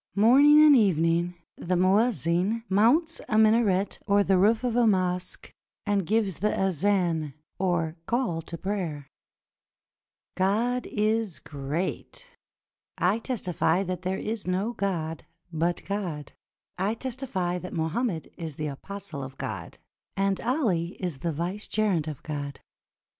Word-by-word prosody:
Morning 280 Hz, +8 st, +7 dB
and 295 Hz, -2 st, +8 dB
evening 175 Hz, -, +2 dB, 0.2 s
the 180 Hz, +1 st, -1 dB
muezzin 195 Hz, +1 st, +2 dB
mounts 250 Hz, -, +3 dB
a 215 Hz, -, +2 dB
minaret 215 Hz, -3 st, +3 dB
or 200 Hz, 0 st, +4 dB
the 190 Hz, -1 st, +3 dB
roof 220 Hz, +5 st, +3 dB
of 245 Hz, -2 st, 0 dB
a 240 Hz, -1 st, +4 dB
mosque, 180 Hz, -2 st, -1 dB, 0.3 s
and 200 Hz, -4 st, 0 dB
gives 210 Hz, -5 st, 0 dB
the 210 Hz, +2 st, 0 dB
azan, 175 Hz, -5 st, +1 dB, 0.2 s
or 175 Hz, -4 st, 0 dB
call 230 Hz, -9 st, 0 dB
to 170 Hz, +1 st, -7 dB
prayer: 175 Hz, -7 st, -3 dB, 1.3 s
"God 230 Hz, +6 st, +1 dB
is 215 Hz, -3 st, 0 dB
great! 150 Hz, -, -4 dB, 0.7 s
I 190 Hz, +5 st, +2 dB
testify 190 Hz, -7 st, 0 dB
that 180 Hz, -2 st, -4 dB
there 185 Hz, +1 st, -2 dB
is 215 Hz, -3 st, -4 dB
no 190 Hz, +6 st, 0 dB
God 165 Hz, -7 st, -3 dB, 0.3 s
but 170 Hz, +2 st, -1 dB
God; 180 Hz, -8 st, -4 dB, 0.5 s
I 200 Hz, +4 st, 0 dB
testify 230 Hz, -9 st, -3 dB
that 180 Hz, -, -8 dB
Mohammed 165 Hz, +3 st, -2 dB
is 160 Hz, -4 st, -6 dB
the 155 Hz, -, -4 dB
apostle 155 Hz, +1 st, -6 dB
of 130 Hz, 0 st, -8 dB
God, -, -, -6 dB, 0.4 s
and 195 Hz, 0 st, +1 dB
Ali 210 Hz, -, 0 dB
is 175 Hz, -8 st, -4 dB
the 170 Hz, +2 st, -1 dB
vicegerent 180 Hz, +1 st, -1 dB
of 150 Hz, -4 st, -6 dB
God. 145 Hz, -2 st, -5 dB
190 Hz, 130 wpm, -27 LUFS, 170-220 Hz, 1.3 s, and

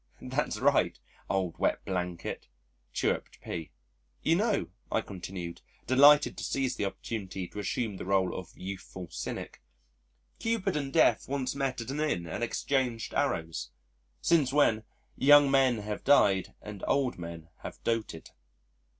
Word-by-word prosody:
"That's -, -, -2 dB
right, -, -, +3 dB, 0.3 s
old 95 Hz, -3 st, -1 dB
wet -, -, 0 dB
blanket," 90 Hz, -2 st, -3 dB, 0.4 s
chirruped -, -, -1 dB
P. 80 Hz, -3 st, -5 dB, 0.5 s
"You 165 Hz, -, +4 dB
know," 210 Hz, -, +1 dB, 0.2 s
I 110 Hz, -, +2 dB
continued, 90 Hz, -3 st, -7 dB, 0.2 s
delighted 145 Hz, +3 st, +6 dB
to -, -, -5 dB
seize 135 Hz, -2 st, -1 dB
the 105 Hz, -, -1 dB
opportunity 95 Hz, -2 st, -4 dB
to -, -, -7 dB
assume 105 Hz, 0 st, -2 dB
the -, -, -6 dB
role 95 Hz, -1 st, +2 dB
of 95 Hz, -2 st, -7 dB
youthful 95 Hz, -2 st, -7 dB
cynic, -, -, -5 dB, 0.8 s
"Cupid 220 Hz, -5 st, 0 dB
and 140 Hz, -2 st, -2 dB
Death 120 Hz, -3 st, +3 dB
once 135 Hz, -2 st, -1 dB
met 135 Hz, -3 st, -2 dB
at 115 Hz, -, -5 dB
an 145 Hz, -, -3 dB
Inn 150 Hz, -, 0 dB
and 95 Hz, +7 st, -4 dB
exchanged 125 Hz, -2 st, -1 dB
arrows, 80 Hz, -7 st, -1 dB, 0.5 s
since 150 Hz, -6 st, +3 dB
when 110 Hz, -7 st, +3 dB, 0.3 s
young 145 Hz, 0 st, +7 dB
men 135 Hz, -3 st, +4 dB
have 105 Hz, 0 st, -5 dB
died 100 Hz, -9 st, +4 dB
and 105 Hz, -2 st, -8 dB
old 135 Hz, -8 st, +1 dB
men 85 Hz, -1 st, -8 dB
have -, -, -8 dB
doted." 115 Hz, -8 st, -2 dB
110 Hz, 140 wpm, -30 LUFS, 95-135 Hz, 0.8 s, young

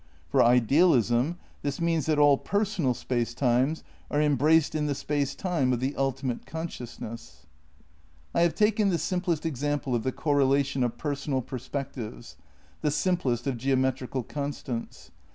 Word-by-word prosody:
For -, -, +4 dB
idealism 125 Hz, -, +4 dB, 0.2 s
this 140 Hz, -1 st, -3 dB
means 165 Hz, -3 st, 0 dB
that 155 Hz, -1 st, +2 dB
all 145 Hz, -1 st, +6 dB
personal 195 Hz, -, 0 dB
space 120 Hz, -1 st, -2 dB
times 130 Hz, +4 st, +1 dB, 0.3 s
are 145 Hz, -, 0 dB
embraced 150 Hz, +2 st, +3 dB
in 150 Hz, -1 st, 0 dB
the 145 Hz, -, -1 dB
Space 145 Hz, -1 st, -1 dB
Time 165 Hz, -9 st, 0 dB
of 125 Hz, -, 0 dB
the 130 Hz, +3 st, -2 dB
ultimate 135 Hz, -2 st, -2 dB
con 160 Hz, +2 st, -4 dB
sciousness. 115 Hz, -, -9 dB, 0.9 s
I -, -, +2 dB
have 170 Hz, -1 st, +3 dB
taken 210 Hz, -1 st, +3 dB
the 175 Hz, -, +1 dB
simplest 175 Hz, -3 st, -1 dB
example 145 Hz, -2 st, -1 dB
of 120 Hz, -, +1 dB
the 130 Hz, -, -1 dB
correlation 140 Hz, -2 st, +1 dB
of 120 Hz, -, -2 dB
personal 140 Hz, -3 st, -2 dB
perspectives, 130 Hz, -, -6 dB, 0.5 s
the 150 Hz, -, +1 dB
simplest 150 Hz, -6 st, 0 dB
of 135 Hz, -3 st, -1 dB
geometrical 130 Hz, 0 st, 0 dB
constants. 140 Hz, -2 st, -5 dB
140 Hz, 145 wpm, -27 LUFS, 125-155 Hz, 0.9 s, all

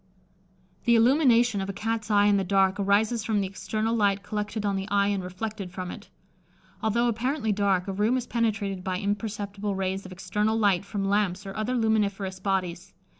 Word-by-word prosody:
The 235 Hz, -, +5 dB
illumination 240 Hz, -3 st, +4 dB
of 195 Hz, -, -4 dB
a -, -, -3 dB
Cat's 220 Hz, +1 st, -3 dB
eye 205 Hz, -1 st, +4 dB
in 205 Hz, -1 st, +4 dB
the 195 Hz, -, +1 dB
dark 195 Hz, +1 st, +2 dB
arises 210 Hz, +3 st, +2 dB
from 210 Hz, -1 st, 0 dB
the 195 Hz, -, 0 dB
external 215 Hz, +4 st, -2 dB
light 200 Hz, -2 st, +2 dB
collected 210 Hz, 0 st, -3 dB
on 200 Hz, -1 st, +1 dB
the 195 Hz, +1 st, -3 dB
eye 200 Hz, 0 st, +2 dB
and 200 Hz, -2 st, -1 dB
reflected 195 Hz, +2 st, -5 dB
from 185 Hz, -1 st, -5 dB
it. -, -, -10 dB, 0.7 s
Although 235 Hz, +2 st, +1 dB
apparently 240 Hz, +1 st, 0 dB
dark, 195 Hz, -2 st, +1 dB
a 195 Hz, -, -2 dB
room 215 Hz, +6 st, +2 dB
is 250 Hz, -, -3 dB
penetrated 210 Hz, -6 st, -1 dB
by 185 Hz, -1 st, -2 dB
imperceptible 205 Hz, 0 st, -3 dB
rays 190 Hz, 0 st, -2 dB
of 185 Hz, -, -11 dB
external 210 Hz, +4 st, -1 dB
light 200 Hz, -4 st, +2 dB
from 200 Hz, -1 st, -3 dB
lamps 200 Hz, -1 st, 0 dB
or 195 Hz, -, -7 dB
other 215 Hz, +4 st, -1 dB
luminiferous 205 Hz, -4 st, 0 dB
bodies. 185 Hz, -2 st, -2 dB
205 Hz, 185 wpm, -26 LUFS, 195-220 Hz, 0.7 s, The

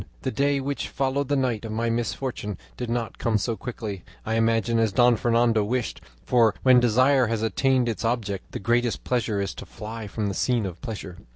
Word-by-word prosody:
"The 130 Hz, -, -1 dB
day 140 Hz, +1 st, +1 dB
which 140 Hz, +1 st, -3 dB
followed 140 Hz, +1 st, -1 dB
the 145 Hz, -, +1 dB
night 125 Hz, -5 st, 0 dB
of 110 Hz, -, -5 dB
my 115 Hz, +1 st, 0 dB
misfortune 115 Hz, -3 st, -3 dB, 0.2 s
did 120 Hz, -, -5 dB
not 115 Hz, -1 st, -2 dB
come 115 Hz, -2 st, +2 dB
so 115 Hz, +3 st, -1 dB
quickly, 110 Hz, -6 st, -6 dB, 0.2 s
I 110 Hz, -, -1 dB
imagine, 115 Hz, 0 st, +2 dB
as 110 Hz, -2 st, +2 dB
Don 120 Hz, +3 st, +5 dB
Fernando 115 Hz, -1 st, +2 dB
wished, 120 Hz, +3 st, -2 dB, 0.2 s
for 115 Hz, -3 st, +4 dB
when 130 Hz, -1 st, +7 dB
desire 130 Hz, +2 st, +4 dB
has 115 Hz, -1 st, -1 dB
attained 130 Hz, +2 st, +2 dB
its 115 Hz, -1 st, -2 dB
object, 110 Hz, -5 st, -2 dB
the -, -, -4 dB
greatest 120 Hz, +3 st, 0 dB
pleasure 115 Hz, -4 st, 0 dB
is 100 Hz, -, -2 dB
to -, -, -9 dB
fly 110 Hz, 0 st, -7 dB
from 105 Hz, +1 st, -3 dB
the 100 Hz, -, -1 dB
scene 120 Hz, +1 st, +1 dB
of 90 Hz, -3 st, -6 dB
pleasure. 105 Hz, -7 st, -6 dB
115 Hz, 200 wpm, -25 LUFS, 110-125 Hz, 0.2 s, when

